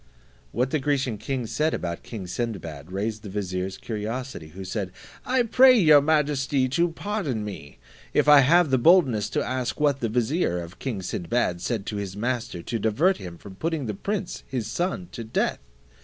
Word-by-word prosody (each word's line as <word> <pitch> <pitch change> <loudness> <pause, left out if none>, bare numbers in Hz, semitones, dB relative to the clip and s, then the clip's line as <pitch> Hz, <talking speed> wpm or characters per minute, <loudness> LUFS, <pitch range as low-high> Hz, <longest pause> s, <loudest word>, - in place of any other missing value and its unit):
What 125 +2 0
the 155 - +1
Grecian 135 -5 0
king 130 0 -3
said 155 +7 0
about 85 -1 -4
king 105 -5 -7
Sinbad 90 -7 -5
raised 105 +3 -2
the 105 - -8
vizier's 95 -1 -3
curiosity, 110 - -5
who 95 +5 -9
said, 95 0 -3 0.4
"I 255 -1 +3
pray 255 +2 +6
your 155 -7 +7
majesty 145 -3 +1
to 170 +7 +2
pardon 165 - -3
me, 75 -9 -8 0.3
if - - +2
I 150 -1 +9
have 155 +3 +5
the 130 - +4
boldness 125 - +4
to - - -1
ask 130 0 -2
what 145 -2 +2
the 115 - -1
vizier 120 - 0
of 85 +2 -9
king 115 -8 -4
Sinbad 90 0 -1
said 110 -3 -2
to 105 - -4
his 100 -1 -5
master 120 -5 -2
to 115 - -3
divert 140 - +2
him 85 -2 -8
from 100 +3 -11
putting 160 - -2
the 105 - -2
prince 200 - -3
his 125 -5 -3
son 180 - -2
to 115 - -6
death." 110 - -1
120 Hz, 185 wpm, -25 LUFS, 100-150 Hz, 0.4 s, I